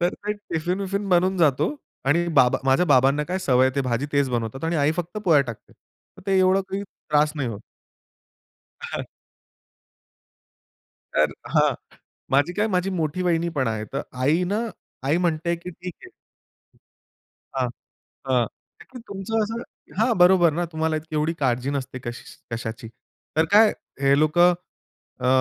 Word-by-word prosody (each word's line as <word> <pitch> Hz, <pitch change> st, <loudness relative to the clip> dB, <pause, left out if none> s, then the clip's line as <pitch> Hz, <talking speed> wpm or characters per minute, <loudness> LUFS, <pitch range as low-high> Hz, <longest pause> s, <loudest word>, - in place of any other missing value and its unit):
तर 175 Hz, +1 st, +1 dB
ते 210 Hz, +1 st, -3 dB
टिफिन-विफिन 195 Hz, +1 st, -3 dB
बनून 185 Hz, +1 st, +3 dB
जातो 155 Hz, -, +2 dB, 0.3 s
आणि 165 Hz, +6 st, +2 dB
बाबा 125 Hz, -3 st, +5 dB
माझ्या 135 Hz, +6 st, +4 dB
बाबांना 135 Hz, +1 st, +4 dB
काय 180 Hz, +4 st, -2 dB
सवय 130 Hz, -7 st, +3 dB
आहे, 130 Hz, -, -1 dB
ते 140 Hz, -, +1 dB
भाजी 125 Hz, +2 st, -1 dB
तेच 140 Hz, -2 st, +2 dB
बनवतात 120 Hz, +4 st, -3 dB
आणि 165 Hz, +1 st, 0 dB
आई 145 Hz, 0 st, +3 dB
फक्त 175 Hz, +4 st, -4 dB
पोळ्या 160 Hz, -6 st, +6 dB
टाकते. 115 Hz, -5 st, -9 dB, 0.5 s
मग -, -, -13 dB
ते 195 Hz, -1 st, +3 dB
एवढं 185 Hz, +1 st, +4 dB
काही 195 Hz, +1 st, -3 dB
त्रास 150 Hz, -6 st, 0 dB
नाही 135 Hz, -4 st, -1 dB
होत. 105 Hz, -3 st, -6 dB, 1.2 s
हां. -, -, -4 dB, 2.1 s
तर -, -, +3 dB, 0.2 s
हां. -, -, +4 dB, 0.6 s
माझी 145 Hz, +6 st, +3 dB
काय 210 Hz, +4 st, +1 dB
माझी 185 Hz, -1 st, 0 dB
मोठी 170 Hz, -1 st, -1 dB
वाहिनी 170 Hz, -1 st, +1 dB
पण 130 Hz, -3 st, +1 dB
आहे. 110 Hz, -1 st, -2 dB
तर -, -, -2 dB, 0.2 s
आई 155 Hz, +7 st, +3 dB
ना, 200 Hz, +4 st, -1 dB, 0.5 s
आई 145 Hz, +4 st, +2 dB
म्हणते, 170 Hz, -1 st, 0 dB
की 175 Hz, +2 st, -8 dB
"ठीक 180 Hz, +1 st, -8 dB
आहे." 375 Hz, -, -12 dB, 1.5 s
हां. 130 Hz, -2 st, +1 dB, 0.6 s
हां. 125 Hz, -3 st, +3 dB, 0.3 s
ताकी 255 Hz, -, -12 dB
तुमचं 200 Hz, +3 st, -1 dB
असं 225 Hz, +3 st, -3 dB, 0.4 s
हां, 230 Hz, +2 st, +3 dB
बरोबर 180 Hz, -2 st, +6 dB
ना, 175 Hz, +3 st, -1 dB
तुम्हाला 160 Hz, 0 st, 0 dB
इतकी 155 Hz, 0 st, -7 dB
एवढी 155 Hz, +2 st, +1 dB
काळजी 130 Hz, 0 st, +1 dB
नसते 130 Hz, -2 st, -4 dB
कशी 120 Hz, +1 st, -6 dB, 0.3 s
कशाची. 115 Hz, 0 st, -6 dB, 0.5 s
तर 160 Hz, -, +4 dB
काय 215 Hz, +1 st, +7 dB, 0.3 s
हे 140 Hz, 0 st, +4 dB
लोकं 175 Hz, +3 st, +5 dB, 0.7 s
अ, -, -, +1 dB
160 Hz, 155 wpm, -24 LUFS, 135-185 Hz, 2.1 s, काय